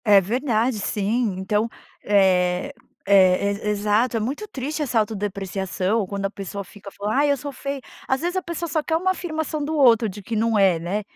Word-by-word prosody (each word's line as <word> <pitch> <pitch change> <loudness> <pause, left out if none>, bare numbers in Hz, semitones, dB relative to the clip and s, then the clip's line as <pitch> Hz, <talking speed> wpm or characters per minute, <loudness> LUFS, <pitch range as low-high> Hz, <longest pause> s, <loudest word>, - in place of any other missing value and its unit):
É 205 -2 +7
verdade 230 +2 0
sim, 210 +1 0
então 210 +4 0 0.3
é 185 +3 +2 0.3
é 195 0 +5 0.2
exato, 210 +4 +1
é - - +1
muito 275 - -3
triste 300 -4 -4
essa 245 -5 +1
autodepreciação 200 -1 -1
quando 200 +1 -4
a - - -9
pessoa 200 0 -6
fica 200 +1 -12
fala, 205 +2 -3
ai 285 +1 +3
eu - - +3
sou 285 +1 -6
feia, 275 +1 -5 0.3
as 265 0 0
vezes 350 +2 -2
a 375 - -1
pessoa 340 0 -4
só 305 +1 0
quer 320 - 0
uma 365 +3 +1
afirmação 315 -4 -3
do 315 +2 -2
outro 235 -6 +5
de 205 +1 -7
que 225 +4 -5
não 225 0 +2
é, 190 -4 +4
né. 175 +6 -2
215 Hz, 195 wpm, -23 LUFS, 200-275 Hz, 0.3 s, É